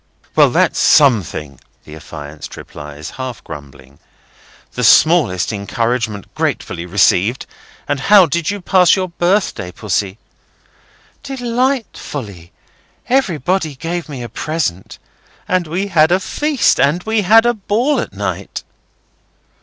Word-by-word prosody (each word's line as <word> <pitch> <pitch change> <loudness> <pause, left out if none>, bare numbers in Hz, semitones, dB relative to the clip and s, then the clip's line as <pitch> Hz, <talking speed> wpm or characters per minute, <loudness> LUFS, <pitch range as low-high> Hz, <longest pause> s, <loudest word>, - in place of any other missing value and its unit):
"Well, - - +6
that's - - +1
something," 95 - +3 0.2
the 75 - -11
affianced 75 -1 -9
replies, 75 +1 -9
half 130 -3 -6
grumbling. 70 -1 -12 0.7
"The 125 - -4
smallest 120 - +4
encouragement 110 0 -2
thankfully 85 +1 -3
received. 100 +5 +2 0.4
And 145 - -1
how 195 +5 +6
did 165 +1 -1
you 205 0 -3
pass 180 -1 +4
your 185 -2 -2
birthday, 175 - 0
Pussy?" 100 0 -2 1.0
"Delightfully! 235 - -3 0.6
Everybody 180 - 0
gave 170 +4 -4
me 130 -4 -6
a 120 - -7
present. 150 - -3 0.5
And 185 -2 0
we 180 +5 -2
had 160 -3 +4
a 185 - +3
feast. 290 +5 +1
And 160 +6 +2
we 220 -1 0
had 225 +4 +5
a 240 - +3
ball 235 +6 0
at - - -4
night." 100 -1 -5
145 Hz, 120 wpm, -17 LUFS, -, 1.0 s, Well